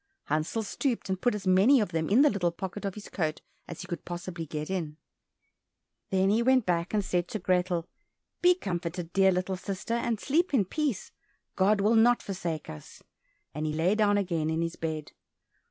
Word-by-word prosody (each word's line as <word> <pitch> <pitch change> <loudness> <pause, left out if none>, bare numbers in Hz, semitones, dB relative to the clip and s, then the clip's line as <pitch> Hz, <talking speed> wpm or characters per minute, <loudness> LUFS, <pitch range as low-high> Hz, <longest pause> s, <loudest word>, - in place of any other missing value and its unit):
Hansel 155 +9 -1
stooped 235 +1 -2
and 190 -1 -2
put 245 - +2
as 205 -1 -6
many 195 +9 +5
of 210 - 0
them 160 -2 -2
in 235 +8 +6
the 295 - +6
little 185 -4 +1
pocket 190 +3 -6
of 195 - -3
his 210 - -9
coat 155 -4 -2 0.3
as 170 - -7
he 185 - -8
could 175 -4 -5
possibly 175 -1 -6
get 150 0 -4
in. 165 -5 -3 1.1
Then 190 0 +2
he 220 +3 +3
went 255 -1 +3
back 170 -1 0
and 210 -2 0
said 175 -1 0
to 215 - -4
Grethel, 180 -3 0 0.5
"Be 360 0 +6
comforted, 175 - -4
dear 195 -1 +5
little 185 +1 -1
sister, 195 +4 -4
and 235 -2 0
sleep 310 - +1
in 210 -7 +3
peace, 285 - -2 0.4
God 200 +2 +3
will 210 +3 +3
not 235 +2 +4
forsake 175 -5 -4
us," 75 -1 -11 0.5
and 155 +1 -3
he 150 - -2
lay 165 +5 +2
down 210 -1 +3
again 170 -6 0
in 160 +1 0
his 165 0 -3
bed. 155 -2 -4
190 Hz, 195 wpm, -28 LUFS, 170-210 Hz, 1.1 s, in